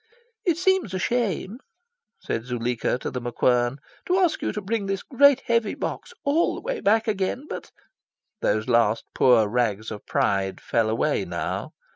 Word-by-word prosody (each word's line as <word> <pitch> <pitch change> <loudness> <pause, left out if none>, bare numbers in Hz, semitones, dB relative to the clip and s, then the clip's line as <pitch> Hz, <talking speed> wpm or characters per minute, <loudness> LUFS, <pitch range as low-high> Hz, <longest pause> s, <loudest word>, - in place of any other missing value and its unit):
"It 335 -3 +3
seems 370 - +1
a - - 0
shame," 220 0 -1 0.6
said 115 - -3
Zuleika 120 -1 -1
to - - -3
The 125 - -4
MacQuern, 120 +1 +1 0.3
"to 365 - +2
ask 360 -4 +2
you - - -1
to - - -4
bring 205 0 -2
this 195 0 -2
great 280 0 +5
heavy 230 -1 0
box 480 - -5
all 300 +4 +2
the - - -7
way - - -3
back 225 +3 +2
again. 210 +6 -1
But - - -7 0.4
" 215 - -60
Those 110 +1 +1
last 115 -2 +2
poor 120 -4 +5
rags 110 -2 -1
of 105 - -8
pride 95 -1 0
fell 115 -2 0
away 110 - +1
now. - - -4
185 Hz, 170 wpm, -24 LUFS, -, 0.6 s, great